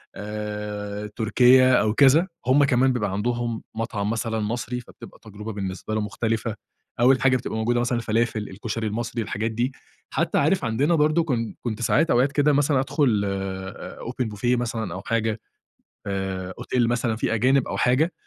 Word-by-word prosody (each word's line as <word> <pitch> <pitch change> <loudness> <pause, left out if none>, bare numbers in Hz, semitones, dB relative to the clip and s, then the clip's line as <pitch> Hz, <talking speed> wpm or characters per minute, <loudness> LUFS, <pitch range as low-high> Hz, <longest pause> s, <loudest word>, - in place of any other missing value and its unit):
آآ، 105 0 -5
تركية 125 +3 +5
أو 110 -3 +3
كذا، 145 +7 +5 0.2
هم 135 +3 +5
كمان 130 -1 +3
بيبقى 105 -5 -1
عندهم 120 +2 -2
مطعم 110 -2 -2
مثلًا 115 0 -1
مصري، 120 +3 -3
فبتبقى - - -14
تجربة 105 0 -8
بالنسبة 100 +1 -5
له 110 - 0
مختلفة. 110 +1 -2 0.4
أول 130 +2 +5
حاجة 130 -1 +4
بتبقى 115 -2 -5
موجودة 120 +2 +1
مثلًا 120 0 0
الفلافل، 115 -2 -1
الكشري 110 +3 -4
المصري، 115 +2 -3
الحاجات 110 +2 -2
دي. 120 +4 -1 0.4
حتى - - 0
عارف - - +2
عندنا 140 +9 +2
برضه 155 +2 +3
كن 120 -7 -2
كنت 115 -1 -4
ساعات 120 +8 +2
أوقات 130 +3 +3
كده 145 +1 +3
مثلًا 140 -1 +3
أدْخُل 130 -6 +1
آآ، 95 -1 -5
أوبن 125 0 -3
بوفيه 120 +4 0
مثلًا 115 -6 -3
أو 95 - -6
حاجة، 115 -1 -1 0.7
آآ، 95 -1 -3
أوتيل 120 -2 0
مثلًا 120 -2 0
في 115 +1 -1
أجانب 130 +4 +2
أو - - -3
حاجة، 140 +8 +2
115 Hz, 165 wpm, -24 LUFS, 105-125 Hz, 0.7 s, تركية